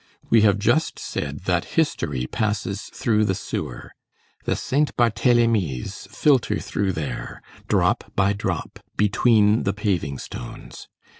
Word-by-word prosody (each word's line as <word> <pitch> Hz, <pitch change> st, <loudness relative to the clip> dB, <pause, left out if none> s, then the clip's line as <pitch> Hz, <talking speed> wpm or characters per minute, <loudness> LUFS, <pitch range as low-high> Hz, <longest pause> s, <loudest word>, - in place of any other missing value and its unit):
We 115 Hz, -, +6 dB
have 105 Hz, -2 st, +4 dB
just 155 Hz, +10 st, +1 dB
said 70 Hz, -1 st, -4 dB
that 90 Hz, -1 st, +1 dB
history 75 Hz, -, 0 dB
passes 105 Hz, -, -2 dB
through 110 Hz, -2 st, 0 dB
the 95 Hz, -2 st, 0 dB
sewer. -, -, -5 dB, 0.5 s
The -, -, +1 dB
Saint 145 Hz, +3 st, 0 dB
Barthélemys 115 Hz, -, +1 dB
filter 110 Hz, -1 st, +2 dB
through 100 Hz, -2 st, -1 dB
there, 75 Hz, -7 st, -5 dB, 0.2 s
drop -, -, +1 dB
by 100 Hz, +1 st, +3 dB
drop, 100 Hz, -, -4 dB, 0.2 s
between 105 Hz, +1 st, +4 dB
the 95 Hz, -, 0 dB
paving 95 Hz, -9 st, -1 dB
stones. -, -, -9 dB
105 Hz, 125 wpm, -23 LUFS, 90-115 Hz, 0.5 s, We